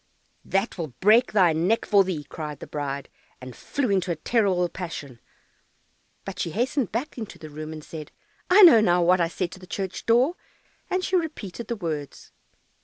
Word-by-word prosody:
"That 195 0 -1
will 155 -7 -5
break 220 +5 +5
thy 185 -6 +4
neck 180 +8 +1
for 200 -2 +5
thee!" 180 -6 -3
cried 150 0 -7
the - - -8
bride, 140 -2 -4 0.3
and 130 -1 -10
flew 265 -6 -2
into 190 -2 +1
a - - -1
terrible 185 0 +1
passion, 150 -9 -7 1.1
but 190 -2 -7
she 170 - -1
hastened 245 - -1
back 250 +4 -4
into 220 - -7
the 155 -1 -11
room, 155 +1 -7
and 155 -1 -8
said, 155 -1 -9 0.4
"I 390 +3 +8
know 310 -11 +9
now 180 -3 +3
what 180 +1 +4
I 170 - +3
said 175 +1 -3
to - - -11
the 185 - -13
church 190 +1 -5
door," 250 +9 +3 0.5
and 370 0 0
she 375 - 0
repeated 235 - -3
the 235 - -2
words. 155 -8 -6
185 Hz, 185 wpm, -25 LUFS, 160-230 Hz, 1.1 s, know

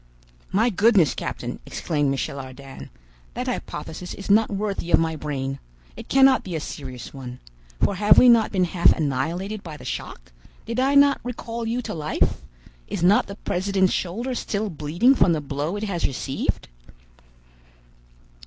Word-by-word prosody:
"My 225 +5 +2
goodness, 200 - +4
captain," - - -5
exclaimed 145 -4 -1
Michel 140 0 -2
Ardan, 135 +1 -10 0.5
"that - - -3
hypothesis 180 +3 -5
is 200 0 -4
not 220 +2 +4
worthy 200 -3 -3
of - - +5
my 165 -1 0
brain! 135 -3 -4 0.4
It - - -10
cannot 270 -1 +5
be 180 -3 -5
a - - -1
serious 130 -5 -8
one. 125 -2 -8 0.4
For - - +2
have 205 +2 +5
we 250 - +8
not 230 -2 +5
been 185 -3 +1
half 175 0 +4
annihilated 165 +8 -2
by 160 -5 -9
the - - -13
shock? - - -6 0.3
Did 230 +2 -3
I 270 +2 +2
not 280 0 +5
recall 235 -1 -5
you 240 +2 -2
to - - -5
life? 155 -2 -1 0.5
Is 160 - -4
not 195 +4 +4
the 200 - -7
president's 190 -1 0
shoulder 230 +9 -2
still 215 -3 -2
bleeding 170 - +2
from 180 -10 +3
the 155 - 0
blow 145 +5 -3
it 205 - -4
has 190 -5 -1
received?" 135 0 -3
180 Hz, 160 wpm, -23 LUFS, 150-215 Hz, 0.5 s, we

